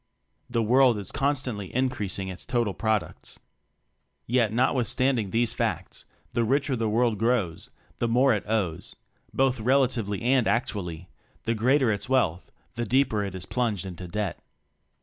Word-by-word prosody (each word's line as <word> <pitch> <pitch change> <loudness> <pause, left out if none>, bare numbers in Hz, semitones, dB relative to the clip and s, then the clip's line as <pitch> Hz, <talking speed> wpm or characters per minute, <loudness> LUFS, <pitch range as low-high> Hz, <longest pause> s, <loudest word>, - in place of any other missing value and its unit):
The 115 - 0
world 125 +1 +4
is 100 -3 -6
constantly 130 -8 -2
increasing 105 -7 -1
its 95 -1 -7
total 120 -5 0
products. 110 -5 -2 0.9
Yet, 120 -3 +2
notwithstanding 125 -1 +1
these 115 +2 +1
facts, - - -3 0.3
the 120 - +1
richer 135 +3 +1
the 115 -2 -1
world 115 -1 +1
grows, 110 -8 0 0.3
the 120 - +1
more 125 +3 +4
it 105 - -1
owes 100 -8 -1 0.4
both 130 -2 +1
relatively 120 -4 +1
and 125 -1 +3
actually; 90 -7 -2 0.4
the 115 - 0
greater 125 +2 +3
its 100 +2 -3
wealth, 95 -10 +1 0.2
the 120 0 -3
deeper 125 -4 +2
it 100 -2 -5
is 95 -1 -6
plunged 110 -6 -1
in 95 - -6
debt. 95 +2 -4
115 Hz, 145 wpm, -26 LUFS, 100-125 Hz, 0.9 s, world